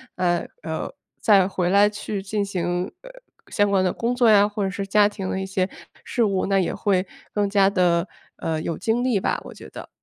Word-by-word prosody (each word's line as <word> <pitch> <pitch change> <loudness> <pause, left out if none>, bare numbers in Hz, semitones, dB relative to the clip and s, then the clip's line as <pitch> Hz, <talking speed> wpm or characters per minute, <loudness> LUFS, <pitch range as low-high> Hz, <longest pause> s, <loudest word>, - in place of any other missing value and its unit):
呃 175 -1 0 0.2
呃， - - -4 0.3
再 195 -4 +5
回 180 -2 -1
来 200 +2 +5
去 210 -1 -5
进 205 +1 -1
行， 180 -1 -2
呃， - - -11 0.4
相 205 -2 +2
关 195 -2 +2
的 180 - +1
工 235 +5 -2
作 245 -2 +4
呀， 205 -1 +6
或 205 0 -3
者 195 - 0
是 195 +1 -5
家 205 +1 +4
庭 195 -3 -5
的 190 - -2
一 - - -3
些 190 0 -1 0.4
事 240 - 0
务， 195 -3 +1
那 195 0 +2
也 185 - 0
会 190 -2 0 0.3
更 205 -1 0
加 195 -1 +4
地， 180 -2 +2 0.3
呃， 160 -1 -2
有 165 - -3
精 230 +2 0
力 250 -6 +2
吧， - - -1
我 - - -10
觉 - - -12
得。 - - -10
195 Hz, 235 characters per minute, -23 LUFS, 185-210 Hz, 0.4 s, 呀